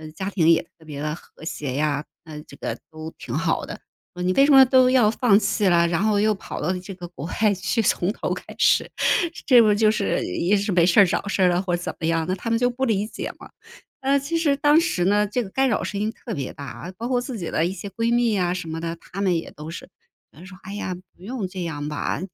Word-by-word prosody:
家 190 +4 -4
庭 165 -5 +3
也 165 - +4 0.2
特 160 - -18
别 145 -1 -6
地 150 - -2
和 160 -1 -13
谐 150 -5 -4
呀， 150 0 0 0.2
那 155 -2 -8
这 140 - -15
个 - - -4
都 155 0 -8
挺 120 - -5
好 165 0 0
的， - - -7 0.4
你 185 +1 +1
为 275 - +5
什 285 - +4
么 270 -1 +9
都 255 0 +5
要 245 -5 +4
放 225 -3 +4
弃 200 0 0
了， 170 -1 +4
然 170 +2 0
后 210 -1 +2
又 215 +1 +3
跑 195 - -7
到 180 +5 -1
这 185 +1 -9
个 180 -1 -8
国 165 -3 -7 0.2
外 210 -2 +5
去， 195 +5 -2
从 180 0 +1
头 - - -3
开 - - -7
始。” - - +3 0.6
这 250 -3 +7
不 215 -2 +4
就 215 0 +4
是 210 -2 0
也 175 - +1
是 200 +1 -1
没 175 -2 +4
事 175 +4 +4
儿 200 - +8
找 185 +2 -2
事 195 -1 +1
儿 - - +6
了 175 +1 +1
或 180 -2 -1
者 - - -9
怎 - - -4
么 160 - -1
样， 165 -1 +1
那 185 - 0
他 195 +5 -4
们 230 - +2
就 245 +1 +1
不 265 +2 -2
理 210 -3 +1
解 215 - -6
嘛。 - - -13 0.5
呃， 275 +1 +2
其 295 +5 -2
实 320 -4 +2
当 295 +2 +4
时 180 - 0
呢， 205 +2 +3
这 210 +5 -1
个 195 - -6
干 265 +5 +1
扰 210 - 0
声 200 - -4
音 215 +1 0
特 225 -2 -7
别 135 -2 -4
大， 145 +6 -8
包 230 - -4
括 250 -1 +1
自 245 -1 -5
己 175 -5 -4
的 160 - +1
一 175 - -1
些 195 +2 -7
闺 230 +3 -1
蜜 240 -2 +2
呀 180 -3 +1
什 180 -2 -5
么 160 +1 -4
的， 170 0 -4
她 195 +3 -8
们 185 -3 +2
也 165 - -5
都 155 +2 -9
是， - - -9 0.4
嗯， 170 +5 -13
说： 185 -1 -12
“哎 195 - -8
呀， 205 -2 -3 0.2
不 175 - -20
用 220 -1 -4
这 185 -1 -6
样 145 -3 -4
吧。” 150 -2 -2
190 Hz, 285 characters per minute, -23 LUFS, 165-225 Hz, 0.6 s, 么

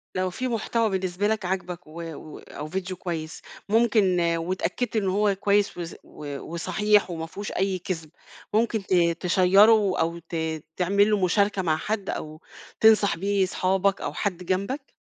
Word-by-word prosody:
لو 185 0 0
في 255 +8 -3
محتوى 230 -1 0
بالنسبة 190 0 -1
لك 215 -3 -1
عجبك 180 -2 -4
و 165 +2 -8
و 155 +1 -10
أو 150 - -8
فيديو 185 +2 -4
كويس 165 -3 -5 0.3
ممكن 215 -5 +3 0.2
واتأكدت 185 +7 -2
إن 205 -3 +1
هو 200 +1 +2
كويس 200 0 +1
وص 170 -1 -5
و 145 -2 -8
وصحيح 210 +4 +1
وما 160 -1 -4
فيهوش 200 +5 -7
أي 190 0 -1
كذب، 165 -3 -5 0.4
ممكن 220 -1 +1
ت 190 - -2 0.3
تشيّره 195 +3 +4
أو 165 +1 0
ت 170 - -5 0.4
تعمل 200 +3 +3
له 205 -3 +1
مشاركة 200 +1 +2
مع 155 -3 +1
حد 205 +3 -3
أو 155 +1 -5 0.4
تنصح 215 -4 +5
بيه 195 +1 +1
صحابك 190 +1 0
أو - - -3
حد 185 -4 -3
جنبك؟ 200 - -2
190 Hz, 160 wpm, -25 LUFS, 175-210 Hz, 0.4 s, تنصح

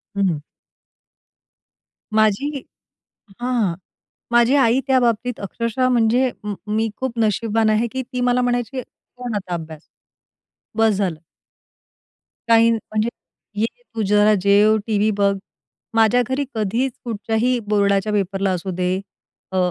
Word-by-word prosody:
हं. 185 -7 0 1.7
माझी 215 +6 +2 0.9
हां, 240 -8 0 0.6
माझी 240 +3 +4
आई 255 -2 +4
त्या 260 -1 +4
बाबतीत 240 0 0
अक्षरशः 230 +5 -1
म्हणजे 245 +1 +3
म 210 -1 -3 0.2
मी 220 0 +1
खूप 260 -3 -3
नशीबवान 220 0 +1
आहे 215 +2 +2
की 260 - -2
ती 250 - -1
मला 245 0 +2
म्हणायची, 245 +1 -1
"सोड 245 -1 -9
आता 185 -3 -4
अभ्यास. 160 -2 -7 0.9
बस 225 -1 +3
झालं." 185 -5 -1 1.3
काही 230 0 +5
म्हणजे, 220 0 -1 0.5
"ये, - - +4 0.3
तू 225 - -1
जरा 210 +1 +5
जेव, 205 +2 +5
टीव्ही 215 0 +2
बघ." 200 0 +3 0.6
माझ्या 225 +2 +4
घरी 275 +2 0
कधीच 225 +5 0
कुठच्याही 230 +2 0
बोर्डाच्या 200 0 +2
पेपरला 195 -1 0
असू 185 +1 -3
दे, 180 +1 0 0.6
अ, 190 - -2
220 Hz, 120 wpm, -21 LUFS, 200-245 Hz, 1.7 s, काही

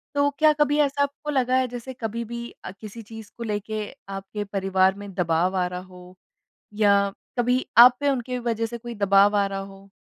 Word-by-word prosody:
तो 285 0 +3
क्या 310 -1 +6
कभी 295 0 +1
ऐसा 285 -1 +1
आपको 285 +1 -5
लगा 255 -2 +1
है 260 -1 +1
जैसे 245 +2 -7
कभी 230 -1 -4
भी 235 +1 -6 0.2
अ, - - -5
किसी 215 +3 -10
चीज़ 220 -1 -11
को 235 - -5
लेके 210 0 -3 0.2
आपके 195 +2 -5
परिवार 190 -1 +1
में 200 -1 -9
दबाव 180 +1 0
आ 180 - +1
रहा 180 0 -5
हो? 180 0 -14 0.6
या 200 -2 +3 0.3
कभी 250 +2 +1
आप 245 +1 +9
पे 285 - +1
उनकी 250 -1 -2
वज़ह 230 -2 -1
से 235 +1 -7
कोई 235 0 -8
दबाव 200 0 +4
आ 200 -1 +3
रहा 195 0 -4
हो? 195 0 -11
215 Hz, 205 wpm, -24 LUFS, 195-245 Hz, 0.6 s, आप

